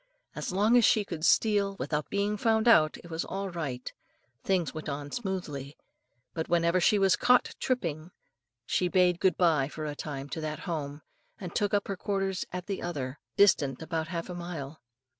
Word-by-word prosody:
As - - -4
long 210 +6 +3
as 240 - +6
she 210 -1 +4
could 165 -5 -6
steal 200 0 +3
without 150 -5 -2
being 200 +1 0
found 220 +1 +2
out, 155 -9 +5
it 170 - -12
was 160 +1 -2
all 195 0 -4
right, 140 -8 -5 0.5
things 185 -4 0
went 155 0 -6
on 145 0 -5
smoothly; 160 - -4 0.6
but 160 - -4
whenever 170 +1 +2
she 210 - +4
was 195 -2 +4
caught 250 0 +3
tripping, 170 - -2 0.6
she 180 - +1
bade 180 -1 +3
good 190 -1 +2
bye 160 -6 +3
for 155 +1 -6
a 150 - -3
time 145 -2 -6
to 160 - -4
that 155 -1 -4
home, 150 -4 -4 0.4
and 180 -3 -7
took 205 -2 0
up 200 - 0
her 195 - -3
quarters 195 -1 -1
at 180 -1 -5
the 195 -1 -4
other, 140 -6 -4 0.2
distant 145 -10 +4
about 160 -1 -2
half 170 0 -4
a 180 - -6
mile. 165 -4 -6
175 Hz, 185 wpm, -29 LUFS, 155-195 Hz, 0.6 s, as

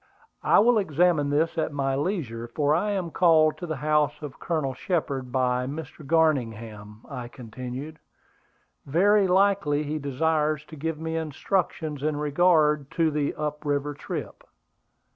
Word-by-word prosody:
"I - - +4
will 230 +2 +5
examine 165 -4 +2
this 160 +3 +1
at - - -1
my 135 -1 -1
leisure; 135 - -3
for 145 +4 +1
I 180 +7 +1
am 190 -5 -2
called 160 -3 +4
to 175 - -5
the 155 - -2
house 150 +1 +1
of 140 -2 -8
Colonel 155 -6 -1
Shepard 135 -5 -2
by 125 -1 +1
Mr. 150 +1 -7
Garningham," 115 -9 -1
I 125 -4 -6
continued. 130 +6 -8 0.9
"Very 195 +7 +4
likely 185 -6 +2
he 150 +1 -3
desires 150 +1 0
to 155 - -9
give 155 +1 -3
me 160 0 -3
instructions 160 -1 -2
in 150 0 -1
regard 150 -1 +3
to 165 -2 +3
the 145 -1 -1
up 150 0 -4
river 145 0 -1
trip. 145 - -6
150 Hz, 145 wpm, -26 LUFS, 135-165 Hz, 0.9 s, will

